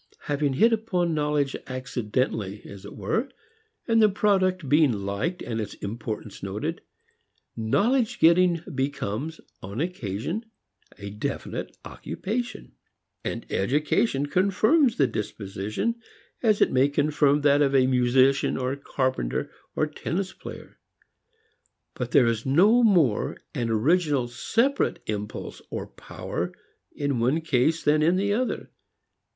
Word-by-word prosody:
Having 145 -1 0
hit 225 - +4
upon 185 -7 0
knowledge 150 -2 0
accidentally, 120 -5 -2
as 100 0 -10
it 100 - -9
were, 220 - -1 0.6
and 225 -1 +4
the 215 - +6
product 190 -5 +1
being 150 0 +4
liked 100 - -3
and 115 -2 -3
its 105 - -6
importance 110 0 -6
noted, 95 +2 -4 0.7
knowledge 215 - +1
getting 170 0 +4
becomes, 140 +2 -3 0.2
upon 100 +5 -6
occasion, 165 - -3 0.5
a 100 0 -7
definite 105 - -5
occupation. 225 - -5 0.5
And - - -4
education 145 - +1
confirms 210 - +3
the 140 - +4
disposition, 105 - -3 0.4
as 215 -4 +3
it - - +4
may 130 +2 +4
confirm 145 0 +2
that 145 0 +4
of 140 -1 +3
a 130 -1 +5
musician 130 +2 +3
or 130 +1 -1
carpenter 130 - -2 0.2
or - - +2
tennis 175 +5 -3
player. - - -11 1.1
But - - -4
there 125 - +5
is 115 -1 0
no 195 - +5
more 175 - +3 0.2
an 115 -1 -2
original 140 +3 +2
separate 230 - 0
impulse 105 -1 -5
or - - -4
power - - -5 0.4
in 140 -4 -2
one 130 +8 +2
case 160 +1 +1
than 150 +1 +3
in 165 +4 +4
the 200 +2 +1
other. 250 +4 -2
145 Hz, 125 wpm, -26 LUFS, 115-180 Hz, 1.1 s, the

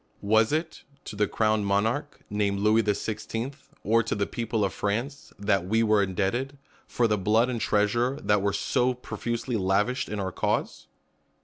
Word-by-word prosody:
Was 110 +3 +3
it 160 +2 -2 0.2
to - - -7
the 105 0 +1
crowned 110 -2 +1
monarch, 115 +9 0
nam^ 100 -1 0
Louis 105 +2 +4
the 105 -2 +1
Sixteenth, 115 +5 -5
or 115 +3 +3
to 115 - -2
the 100 -1 0
people 115 -2 -1
of 95 - -3
France, 120 +8 -3
that 100 -3 0
we 110 +3 +2
were 105 -2 +4
indebted, 105 +9 -1 0.3
for 120 - +1
the 105 -2 +1
blood 110 +5 +3
and 120 -3 -3
treasure 120 +6 +1
that 105 -1 +2
were 100 0 +1
so 125 +5 +1
profusely 120 -1 -3
lavished 105 +6 0
in 105 - -3
our 95 -1 -2
cause - - -2
110 Hz, 175 wpm, -27 LUFS, 100-120 Hz, 0.3 s, Louis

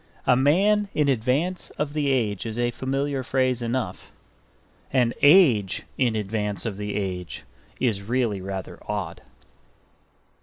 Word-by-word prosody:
A 125 - +5
man 195 +10 +3
in 150 -1 +2
advance 140 +9 0
of 150 -1 -2
the 150 -2 0
age 115 -6 0
is 110 0 -5
a 120 0 +1
familiar 135 +2 -2
phrase 130 -1 0
enough. 115 -5 -3 0.8
An 125 -3 +2
age 145 - +5
in 120 -4 +1
advance 105 0 -2
of 105 -4 -3
the 105 0 -4
age 90 -3 -4 0.4
is 110 -6 +1
really 115 -2 -1
rather 95 0 -6
odd. - - -4
120 Hz, 130 wpm, -25 LUFS, 105-140 Hz, 0.8 s, A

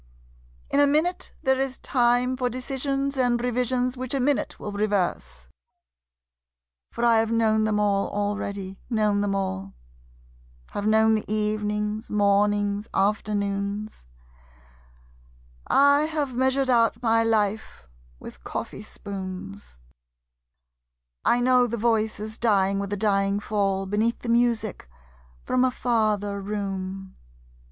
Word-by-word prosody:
In - - +3
a 285 - +6
minute 315 +5 0
there 265 -2 +2
is 270 -1 -2
time 245 0 +1
For 250 -1 -1
decisions 275 +2 -2
and 245 -2 +2
revisions 250 +1 0
which 255 +1 -4
a - - 0
minute 275 +2 0
will 210 - -5
reverse. 180 - -2 1.4
For 235 - -1
I 230 -1 +5
have 225 0 0
known 220 -1 +2
them 215 -1 +1
all 200 -1 +1
already, 200 -2 -3
known 210 -3 +1
them 200 -1 0
all: 95 - -3 1.0
Have 205 +1 -3
known 220 0 +4
the 215 -1 -2
evenings, 210 0 -1
mornings, 205 0 +1
afternoons, 200 - -1 1.6
I 285 +2 +5
have 300 -4 -2
measured 260 +1 +1
out 230 0 +2
my 225 -1 +3
life 215 - -1 0.3
with - - -12
coffee - - -5
spoons; 195 - -8 1.5
I 245 - +3
know 250 0 +4
the 235 0 -3
voices 220 -1 -1
dying 200 -3 +2
with 200 0 -4
a 205 - -1
dying 200 -1 +1
fall 195 -2 -1
Beneath 215 +4 0
the 240 - -4
music 230 - 0 0.5
from 255 0 +1
a 260 - +4
farther 215 -5 0
room. 195 -1 -5
215 Hz, 120 wpm, -25 LUFS, 200-245 Hz, 1.6 s, a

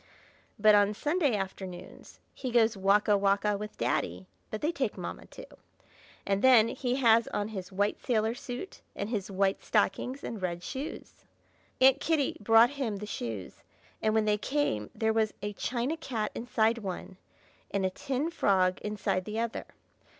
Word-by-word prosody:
But 215 0 +6
on 205 0 +4
Sunday 295 - +1
afternoon 190 -2 -6 0.3
he 260 - -5
goes 230 -2 +3
walk 200 +2 +3
a 210 - +5
walk 200 +1 +2
a 210 0 +2
with 210 +1 -7
Daddy 95 -6 -1 0.2
(but 215 - -5
they 310 - +1
take 265 -10 -2
Mamma - - -6
too!), - - -11 0.8
and 200 0 0
then 240 -4 +6
he 250 -1 -2
has 230 -3 +4
on 205 +1 -2
his 190 -4 -6
white 205 +2 0
sailor 225 -2 +1
suit, 250 +8 -7
and 200 - -3
his 210 -5 -2
white 195 0 +1
stockings 265 +3 0
and 220 -4 -5
red 175 -1 -3
shoes. 275 - -7 0.6
Aunt 265 +1 +6
Kitty 305 -3 +1
brought 225 +3 +6
him 265 -7 -2
the 205 +1 -6
shoes, 115 - -6 0.4
and 215 0 +1
when 220 -1 +3
they 210 0 +2
came 235 - -1
there 220 0 +1
was 220 -1 +1
a 205 0 -3
china 245 +8 -2
cat 225 -9 -3
inside 230 -1 +1
one, 190 -2 -6 0.5
and 195 -1 0
a 185 - 0
tin 275 - -2
frog 185 - +2
inside 205 -3 -2
the 215 +1 -3
other. 230 0 -3
215 Hz, 170 wpm, -29 LUFS, 195-245 Hz, 0.8 s, But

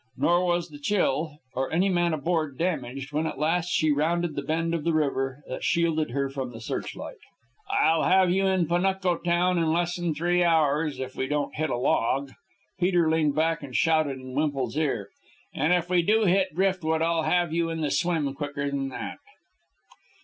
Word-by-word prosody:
Nor 175 +2 +2
was 175 0 0
the 145 -1 -11
Chill 155 -4 0 0.2
or 130 +1 -2
any 180 +4 +2
man 175 -2 +1
aboard 155 -2 -1
damaged 140 -5 -3
when 155 +2 0
at - - -5
last 165 +4 0
she 155 -3 +2
rounded 165 +3 0
the - - -2
bend 165 +1 -1
of 165 -3 -2
river 140 -4 0
that 130 - -6
shielded 165 -3 +1
her 140 +3 -1
from 135 -2 -5
the 115 - -9
searchlight. 115 - -6 0.5
"I'll 165 - +3
have 185 -1 +4
you 195 +1 +2
in 190 -2 +2
Panuco 180 +1 +1
town 175 +1 +1
in 165 - +1
less'n 175 -1 -1
three 175 +3 +1
hours,... 155 -2 +2
if 130 0 -5
we 130 - -2
don't 150 0 -1
hit 155 0 -2
a - - -1
log," 130 +3 0 0.5
Peter 175 -3 +2
leaned 155 -3 +2
back 160 +1 +1
and 135 -4 -8
shouted 155 -4 +2
in 130 0 -9
Wemple's 135 -4 -1
ear. 140 -10 -1 0.4
"And 150 +5 +1
if 175 -1 +2
we 180 -1 +3
do 215 +5 +2
hit 185 -3 +2
driftwood, 175 -4 +1
I'll 165 0 +1
have 175 0 +1
you 170 0 0
in 165 -1 -3
the 150 -2 -1
swim 160 -6 0
quicker 140 0 -4
than 135 -1 -2
that." 130 - -6
160 Hz, 185 wpm, -26 LUFS, 140-175 Hz, 0.5 s, have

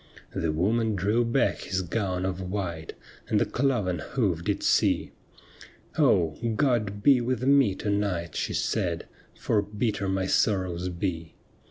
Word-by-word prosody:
The 80 - -1
woman 110 +7 +1
drew 105 +6 +1
back 120 +3 +1
his 95 -1 -2
gown 95 -1 -2
of 95 0 -2
white. 90 -4 -4 0.3
And - - +2
the - - +2
cloven 120 - 0
hoof 90 - -1
did 100 +1 -1
see: - - +2 0.4
' - - -20
Oh! 80 -3 +3 0.2
God 110 -7 0
be 135 -3 +6
with 125 0 -1
me 135 -7 +4
to 105 - -2
night,' 90 -6 -1
she - - -2
said, - - -1 0.2
' - - -30
For 105 - +1
bitter 105 -1 -2
my 95 0 0
sorrows 90 -3 +1
be. 85 -2 -4
100 Hz, 155 wpm, -27 LUFS, 90-115 Hz, 0.4 s, be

